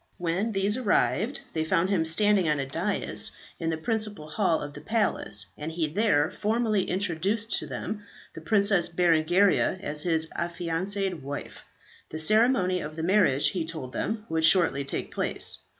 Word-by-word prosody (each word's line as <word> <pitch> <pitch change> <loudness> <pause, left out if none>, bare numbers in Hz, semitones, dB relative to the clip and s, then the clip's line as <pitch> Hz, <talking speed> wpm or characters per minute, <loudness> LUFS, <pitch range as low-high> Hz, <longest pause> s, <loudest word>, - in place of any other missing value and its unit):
When 180 +6 -1
these 200 +2 0
arrived, 235 +1 0
they 160 - -1
found 175 +3 +1
him 170 -5 +1
standing 190 +1 +2
on 150 -1 +1
a 135 - -2
da‹s 170 +9 -1 0.3
in 165 - -2
the 160 - -1
principal 210 -2 -3
hall 170 -1 +1
of 145 -1 -7
the - - -10
palace, 210 - +1
and 150 +2 -4
he 160 -1 -1
there 165 -4 +2
formally 215 -2 0
introduced 195 +4 -1
to - - -7
them 210 -1 -5 0.3
the 160 - -9
Princess 200 -1 +2
Berengaria 175 +3 +2
as 150 -3 -2
his 160 -1 +1
affianced 175 +3 -1
wife. 145 -3 -8 0.4
The 155 - -6
ceremony 190 +1 +3
of 155 -2 -7
the 160 - -4
marriage, 180 -7 +3
he 180 -4 -2
told 155 -6 -6
them, 215 -1 -3
would 160 0 -1
shortly 165 -5 +4
take 135 - -5
place. - - -1
175 Hz, 165 wpm, -27 LUFS, 160-205 Hz, 0.4 s, shortly